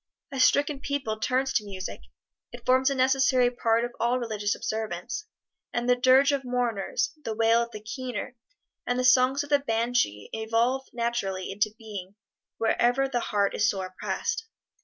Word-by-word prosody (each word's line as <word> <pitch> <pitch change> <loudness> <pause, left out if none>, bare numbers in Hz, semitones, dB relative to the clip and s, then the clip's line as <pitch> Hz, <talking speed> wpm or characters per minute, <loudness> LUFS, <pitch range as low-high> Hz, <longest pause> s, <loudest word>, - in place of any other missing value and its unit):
A 270 - -4
stricken 285 +2 +3
people 275 -7 -3
turns 260 +4 0
to 215 - +1
music; 195 -2 -6 0.5
it - - -11
forms 260 +1 +4
a 275 - -1
necessary 260 -1 +3
part 230 -1 +1
of 240 - -6
all 240 +2 +2
religious 215 -4 -1
observance, 220 - -4 0.5
and 240 0 -1
the 250 - +5
dirge 260 +3 +5
of 280 -1 -1
mourners, 245 -2 -1
the 225 -4 -3
wail 225 +1 +4
of 235 - -3
the 215 -2 -9
"keener," 245 +2 -5 0.5
and 245 - 0
the 255 - 0
songs 255 +2 +4
of 290 - -11
the 285 - +5
banshee 230 - 0
evolve 230 +4 0
naturally 230 -6 -2
into 205 +2 +1
being 205 -4 -8 0.4
wherever 245 +4 +2
the 245 -2 -1
heart 200 -3 0
is 215 +1 +2
sore 190 -2 -2
oppressed. 455 - -3
240 Hz, 165 wpm, -27 LUFS, 220-260 Hz, 0.5 s, the